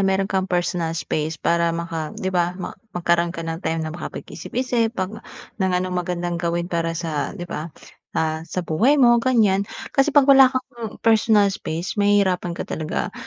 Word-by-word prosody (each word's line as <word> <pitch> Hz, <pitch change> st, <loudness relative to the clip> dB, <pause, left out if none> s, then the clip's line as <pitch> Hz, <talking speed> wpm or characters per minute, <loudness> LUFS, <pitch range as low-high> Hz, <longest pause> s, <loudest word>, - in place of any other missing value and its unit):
meron 195 Hz, 0 st, +2 dB
kang 190 Hz, -1 st, -1 dB
personal 175 Hz, -2 st, -1 dB
space, 155 Hz, 0 st, -2 dB
para 170 Hz, +2 st, +1 dB
maka 165 Hz, -2 st, -4 dB
di 190 Hz, 0 st, -3 dB
ba, 175 Hz, 0 st, +1 dB
ma 185 Hz, -, -5 dB, 0.2 s
magkaroon 170 Hz, 0 st, +2 dB
ka 165 Hz, -1 st, -6 dB
ng 165 Hz, +1 st, -4 dB
time 160 Hz, -2 st, -2 dB
na 155 Hz, -, -4 dB
makapag 175 Hz, -, -7 dB
isip-isip 245 Hz, -2 st, -1 dB
'pag 195 Hz, +4 st, -3 dB, 0.4 s
ng 190 Hz, -, +2 dB
anong 185 Hz, 0 st, -2 dB
magandang 175 Hz, -1 st, -2 dB
gawin 170 Hz, 0 st, -1 dB
para 165 Hz, -1 st, -2 dB
sa 160 Hz, +1 st, -3 dB
di 175 Hz, -, -5 dB
ba, 165 Hz, -1 st, -5 dB, 0.5 s
ah, 160 Hz, 0 st, 0 dB
sa 180 Hz, +1 st, -3 dB
buhay 230 Hz, -, +3 dB
mo, 240 Hz, -3 st, +5 dB
ganyan. 210 Hz, -6 st, +2 dB, 0.2 s
Kasi 285 Hz, +2 st, +2 dB
'pag 280 Hz, -, +8 dB
wala 270 Hz, -2 st, +8 dB
kang 250 Hz, -4 st, -5 dB
personal 215 Hz, -3 st, +4 dB
space, 175 Hz, +3 st, -4 dB
mahihirapan 190 Hz, -4 st, +2 dB
ka -, -, -4 dB
talaga. 155 Hz, -1 st, -3 dB
180 Hz, 175 wpm, -22 LUFS, 170-210 Hz, 0.5 s, pag